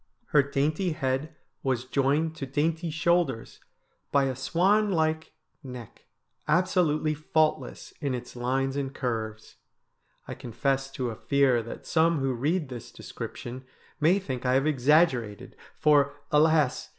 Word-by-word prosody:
Her 150 Hz, -, +5 dB
dainty 150 Hz, +5 st, 0 dB
head 135 Hz, +2 st, -2 dB, 0.3 s
was 130 Hz, -2 st, -1 dB
joined 145 Hz, +5 st, +1 dB
to 135 Hz, -, -5 dB
dainty 160 Hz, +5 st, -1 dB
shoulders 160 Hz, -6 st, 0 dB, 0.5 s
by 140 Hz, -1 st, +4 dB
a 135 Hz, -1 st, -1 dB
swan 195 Hz, -, +2 dB
like 160 Hz, -3 st, 0 dB, 0.3 s
neck, 125 Hz, -5 st, -10 dB, 0.4 s
absolutely 160 Hz, -3 st, +2 dB
faultless 155 Hz, -, -1 dB
in 140 Hz, -3 st, -1 dB
its 125 Hz, 0 st, -8 dB
lines 135 Hz, +2 st, -1 dB
and 135 Hz, -1 st, -3 dB
curves. 110 Hz, -4 st, -4 dB, 0.7 s
I -, -, -5 dB
confess 135 Hz, +3 st, -2 dB
to 125 Hz, -2 st, -2 dB
a -, -, -7 dB
fear 135 Hz, -1 st, +2 dB
that 115 Hz, -, -9 dB
some 165 Hz, 0 st, +2 dB
who 135 Hz, -2 st, 0 dB
read 150 Hz, +5 st, -1 dB
this 120 Hz, -3 st, -8 dB
description 125 Hz, +2 st, -8 dB, 0.4 s
may 165 Hz, +5 st, +4 dB
think 130 Hz, -11 st, -4 dB
I 130 Hz, 0 st, +2 dB
have 135 Hz, +2 st, +2 dB
exaggerated, 135 Hz, -, +2 dB, 0.2 s
for, 145 Hz, -2 st, +3 dB, 0.2 s
alas 150 Hz, -2 st, +3 dB
140 Hz, 135 wpm, -27 LUFS, 130-160 Hz, 0.7 s, Her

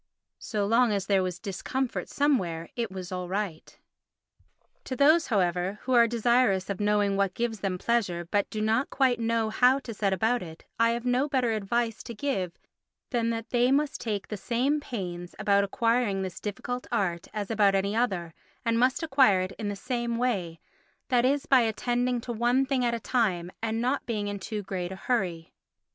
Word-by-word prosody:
So 210 Hz, -3 st, -2 dB
long 230 Hz, +2 st, +3 dB
as 200 Hz, -2 st, -1 dB
there 195 Hz, -1 st, +3 dB
was 180 Hz, -2 st, -2 dB
discomfort 230 Hz, +8 st, -3 dB
somewhere 180 Hz, -, 0 dB
it 235 Hz, -3 st, -2 dB
was 190 Hz, 0 st, -7 dB
all 180 Hz, -1 st, -3 dB
right. 190 Hz, -4 st, -4 dB, 1.1 s
To 260 Hz, -, -4 dB
those, 310 Hz, +5 st, +5 dB
however, 185 Hz, -2 st, 0 dB
who 260 Hz, -, -1 dB
are 235 Hz, -1 st, +6 dB
desirous 230 Hz, -4 st, +2 dB
of 195 Hz, -, -4 dB
knowing 205 Hz, -1 st, +2 dB
what 195 Hz, -2 st, +1 dB
gives 235 Hz, -2 st, -2 dB
them 190 Hz, -2 st, -2 dB
pleasure 185 Hz, -5 st, 0 dB
but 205 Hz, -1 st, +1 dB
do 215 Hz, -, -4 dB
not 225 Hz, +5 st, +1 dB
quite 260 Hz, -3 st, +2 dB
know 225 Hz, -1 st, 0 dB
how 250 Hz, +4 st, +4 dB
to 235 Hz, -, -7 dB
set 200 Hz, -2 st, 0 dB
about 220 Hz, +6 st, +1 dB
it 160 Hz, -2 st, -10 dB
I 230 Hz, 0 st, +5 dB
have 235 Hz, +1 st, -4 dB
no 250 Hz, +4 st, +1 dB
better 255 Hz, -4 st, +1 dB
advice 225 Hz, +2 st, -1 dB
to 235 Hz, -, -8 dB
give 195 Hz, -9 st, -2 dB, 0.5 s
than 235 Hz, -2 st, +1 dB
that 230 Hz, -1 st, -4 dB
they 245 Hz, +1 st, +3 dB
must 285 Hz, +1 st, +1 dB
take 210 Hz, -4 st, -3 dB
the 210 Hz, -, -4 dB
same 255 Hz, +8 st, 0 dB
pains 180 Hz, -10 st, -6 dB
about 200 Hz, -1 st, +3 dB
acquiring 230 Hz, -1 st, +1 dB
this 185 Hz, -1 st, -6 dB
difficult 245 Hz, +4 st, -4 dB
art 185 Hz, -7 st, -1 dB
as 210 Hz, 0 st, -4 dB
about 205 Hz, -3 st, +4 dB
any 200 Hz, +2 st, 0 dB
other, 190 Hz, -9 st, -1 dB, 0.3 s
and 230 Hz, 0 st, +2 dB
must 260 Hz, +6 st, +2 dB
acquire 265 Hz, -11 st, +4 dB
it 185 Hz, +1 st, -3 dB
in 215 Hz, -, -3 dB
the 205 Hz, -, -3 dB
same 235 Hz, +2 st, -2 dB
way—that 240 Hz, -, -2 dB
is 280 Hz, +2 st, +1 dB
by 265 Hz, -, +5 dB
attending 245 Hz, +2 st, 0 dB
to 240 Hz, 0 st, -5 dB
one 240 Hz, +4 st, +2 dB
thing 265 Hz, -2 st, 0 dB
at 235 Hz, -1 st, +1 dB
a -, -, -4 dB
time 195 Hz, -7 st, 0 dB
and 225 Hz, 0 st, -1 dB
not 255 Hz, +4 st, -1 dB
being 210 Hz, -3 st, -2 dB
in 205 Hz, 0 st, -4 dB
too 210 Hz, +1 st, -4 dB
great 185 Hz, -2 st, -4 dB
a -, -, -5 dB
hurry. 185 Hz, -7 st, -2 dB
225 Hz, 190 wpm, -27 LUFS, 195-245 Hz, 1.1 s, are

